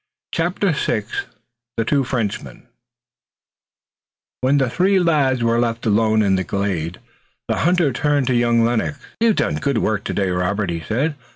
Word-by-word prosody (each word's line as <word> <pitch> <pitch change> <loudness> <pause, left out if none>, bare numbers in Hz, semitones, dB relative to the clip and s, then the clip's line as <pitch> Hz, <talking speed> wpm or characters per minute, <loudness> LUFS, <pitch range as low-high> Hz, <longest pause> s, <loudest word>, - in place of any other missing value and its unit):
CHAPTER 180 +3 0
VI 110 -7 -1 0.7
THE 115 - 0
TWO 140 +2 +2
FRENCHMEN 105 - -3 1.8
When 135 +3 +3
the 135 -2 +2
three 190 +10 +2
were 130 -9 +2
left 115 0 -1
alone 110 0 +3
in 95 -2 +2
the 95 - -1
glade 90 -4 -2 0.5
the - - 0
hunter 175 -5 +2
turned 145 +1 +1
to 130 - +1
young 120 -1 +3
Lennox. 120 +5 0 0.2
"You've 225 -2 +3
done - - 0
good 140 -2 -1
work 110 -2 0
today, 95 -2 -1
Robert," 90 +2 -1
he 85 - -3
said. 130 - -1
120 Hz, 150 wpm, -20 LUFS, 105-145 Hz, 1.8 s, When